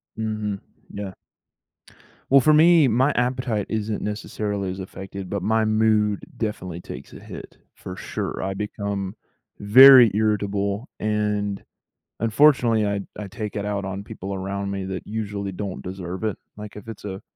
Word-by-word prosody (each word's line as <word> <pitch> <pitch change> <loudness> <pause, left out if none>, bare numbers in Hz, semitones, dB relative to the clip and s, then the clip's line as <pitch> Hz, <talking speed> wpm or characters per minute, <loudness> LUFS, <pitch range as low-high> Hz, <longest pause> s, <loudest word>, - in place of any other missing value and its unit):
Mhm, 105 -2 -3 0.3
yeah. 100 -2 -5 1.2
Well, 135 0 +7
for 155 +4 +5
me, 160 -1 +6
my 130 +5 +3
appetite 125 -4 0
isn't 110 -1 -2
necessarily 105 -2 -3
as 95 - -7
affected, 95 0 -7
but 100 - -3
my 110 0 +2
mood 110 -1 +2 0.2
definitely 90 -6 -4
takes - - -9
a - - -10
hit, - - -10 0.2
for 90 - -8
sure. - - -4
I 95 +1 -2
become 100 0 -4 0.4
very 125 +3 +9
irritable, 105 +1 0
and, 105 -2 -1 0.6
unfortunately, 115 -2 +4
I 100 0 -1 0.2
I 105 -2 -5
take 105 +1 -6
it 100 - -2
out 100 -1 -2
on 95 +1 -5
people 95 +1 -6
around 100 +1 -3
me 95 -1 -3
that 95 -1 -5
usually 100 -3 -4
don't 95 0 -5
deserve 95 +2 -6
it. 110 - -1 0.2
Like, 105 0 -9
if 105 +2 -10
it's 110 -2 -9
a 95 -1 -6
105 Hz, 150 wpm, -23 LUFS, 100-110 Hz, 1.2 s, very